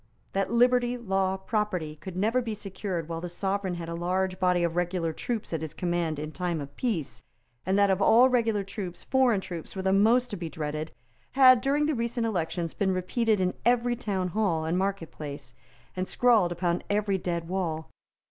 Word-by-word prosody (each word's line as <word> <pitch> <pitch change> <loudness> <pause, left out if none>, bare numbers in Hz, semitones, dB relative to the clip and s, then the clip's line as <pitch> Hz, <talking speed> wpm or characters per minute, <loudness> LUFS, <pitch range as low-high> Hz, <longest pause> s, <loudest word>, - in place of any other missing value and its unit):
That 195 0 0
liberty, 245 +1 +3
law, 195 -4 0
property, 190 -6 -2
could 185 +3 -8
never 225 +6 +2
be 225 -3 -4
secured 190 -4 -4
while 165 -1 -4
the 175 - -5
Sovereign 190 +1 -2
had 170 -1 -6
a 170 - -4
large 185 +2 -1
body 180 -1 +2
of 170 -1 0
regular 175 -2 -1
troops 230 -1 -4
at 160 - -1
his 160 0 -6
command 175 -3 -1
in 155 +1 -5
time 175 -1 -2
of 140 -1 -8
peace, 190 - -2 0.5
and 190 +1 +2
that 200 -1 +4
of 190 +1 +1
all 235 +5 +7
regular 230 -5 +1
troops 195 -2 -7
foreign 255 -6 +3
troops 175 -2 -7
were 190 - -3
the 190 0 +2
most 235 +5 +4
to - - -2
be 170 -2 -5
dreaded, 155 0 -4 0.4
had, 255 -2 +7
during 285 +3 +2
the 310 - +1
recent 235 -1 -1
elections, 175 -5 -2
been 195 -2 0
repeated 215 +4 +1
in 185 -1 +1
every 245 +1 +2
town 195 -6 -2
hall 180 -5 0
and 165 +2 0
market 195 -4 -2
place, 140 -4 -7 0.4
and 185 0 -2
scrawled 225 -8 +3
upon 175 0 0
every 205 -1 +1
dead 170 -2 -3
wall. 165 -4 -3
190 Hz, 195 wpm, -27 LUFS, 170-220 Hz, 0.5 s, all